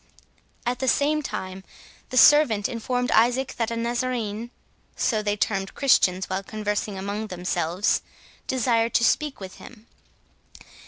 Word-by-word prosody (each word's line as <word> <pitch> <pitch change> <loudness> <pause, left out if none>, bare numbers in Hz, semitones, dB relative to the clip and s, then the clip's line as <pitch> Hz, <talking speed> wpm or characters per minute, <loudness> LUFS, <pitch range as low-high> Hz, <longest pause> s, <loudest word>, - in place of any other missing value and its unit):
At 245 +1 -1
the 265 - -2
same 295 +4 +2
time 190 -8 -6 0.5
the 255 - -3
servant 255 -9 +6
informed 245 +1 -2
Isaac, 245 +4 +3
that 230 -2 0
a 230 - -3
Nazarene 235 -2 -2 0.5
(so 220 -4 0
they 205 0 -1
termed 195 -2 -1
Christians, 190 -9 +3
while 190 +1 -2
conversing 210 0 -3
among 200 +3 -4
themselves) 180 0 -1 0.5
desired 235 -2 +1
to - - +4
speak 295 +4 +1
with 190 -1 -9
him. 230 -3 -14
225 Hz, 130 wpm, -24 LUFS, 200-250 Hz, 0.5 s, servant